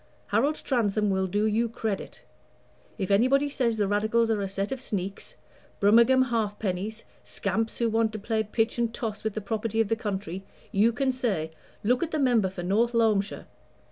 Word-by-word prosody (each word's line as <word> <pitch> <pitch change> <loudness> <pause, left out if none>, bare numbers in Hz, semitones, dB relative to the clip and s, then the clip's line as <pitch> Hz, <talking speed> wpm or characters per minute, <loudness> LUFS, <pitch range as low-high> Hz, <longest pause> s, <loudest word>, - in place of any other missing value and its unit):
Harold 300 +2 +2
Transome 215 -5 +1
will 190 0 +1
do 205 +3 0
you 225 +2 +1
credit; 220 -3 -4 0.7
if 195 -2 -2
anybody 270 +7 +3
says 235 -5 0
the 205 -2 +1
Radicals 220 +3 +2
are 210 -2 0
a 195 - -2
set 195 +3 -3
of 265 -2 -3
sneaks, 200 -5 -5 0.4
Brummagem 235 +5 +5
half 215 -3 0
pennies, 205 +3 -3 0.2
scamps 220 +3 -2
who 235 - +1
want 225 0 +1
to - - -3
play 220 +1 -1
pitch 225 +2 -1
and 235 -1 +1
toss 225 -3 -4
with 220 -2 -2
the 215 - -2
property 220 +2 -2
of 225 -2 +2
the 225 - +2
country, 195 -4 -4 0.3
you 215 +4 +4
can 265 +3 0
say, 210 -11 -1 0.3
'Look 245 +4 +2
at 340 - -1
the 315 - -2
member 240 -8 +3
for 180 -1 -7
North 220 +6 +2
Loamshire!' 215 -3 +1
220 Hz, 185 wpm, -27 LUFS, 200-235 Hz, 0.7 s, Brummagem